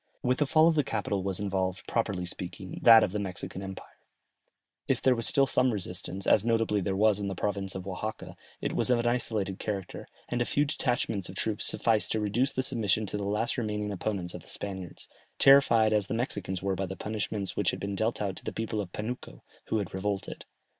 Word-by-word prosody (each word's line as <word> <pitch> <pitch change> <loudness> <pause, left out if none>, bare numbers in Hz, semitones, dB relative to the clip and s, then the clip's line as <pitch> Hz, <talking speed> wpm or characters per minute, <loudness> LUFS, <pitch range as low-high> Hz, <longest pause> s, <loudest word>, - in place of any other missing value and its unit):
With 125 +1 +1
the 150 - +2
fall 155 +2 +5
of 170 - +5
the 150 -2 +2
capital 105 -4 -2
was 95 -1 0
involved, 95 -2 -2
properly 100 -6 -1
speaking, 90 +1 -5
that 115 -1 +9
of - - 0
the 105 - -2
Mexican 95 -1 -5
empire; 95 -1 -9 0.9
if - - +2
there 130 - +4
were 115 - -2
still 135 +4 +3
some 130 -1 +3
resistance, 95 -2 -4
as 105 - +5
notably 115 -3 +1
there 95 +1 -1
was 105 0 +3
in 100 - -2
the 95 - -3
province 100 0 -2
of 95 -1 -5
Oaxaca, 100 +3 -5 0.3
it - - -2
was - - +1
of 125 - +4
an 120 - -1
isolated 110 -5 0
character, 100 -4 -4 0.2
and 120 - -1
a - - +2
few 145 +4 +2
detachments 120 - -1
of 95 - -9
troops 105 +2 -1
sufficed 110 -2 +1
to 110 - 0
reduce 115 +6 +1
to 130 - 0
submission 110 -5 +1
the 105 +1 -3
last 105 +5 0
remaining 105 -2 -2
opponents 95 -2 -3
of - - -7
the - - -17
Spaniards, 95 -3 -4 0.3
terrified 115 -6 +6
as 105 -2 +2
the - - -2
Mexicans 95 -6 -3
were 100 0 +1
by 95 0 -2
the 95 - -5
punishments 105 -2 -3
which - - +1
had - - -3
been 100 0 -3
dealt 110 +4 0
out 95 -2 -2
to - - -8
the - - -3
people 110 -1 -2
of 90 -3 -7
Panuco, 115 +6 -6 0.2
who 110 - 0
had 100 -4 -3
revolted. 95 +1 -3
105 Hz, 215 wpm, -29 LUFS, 95-115 Hz, 0.9 s, that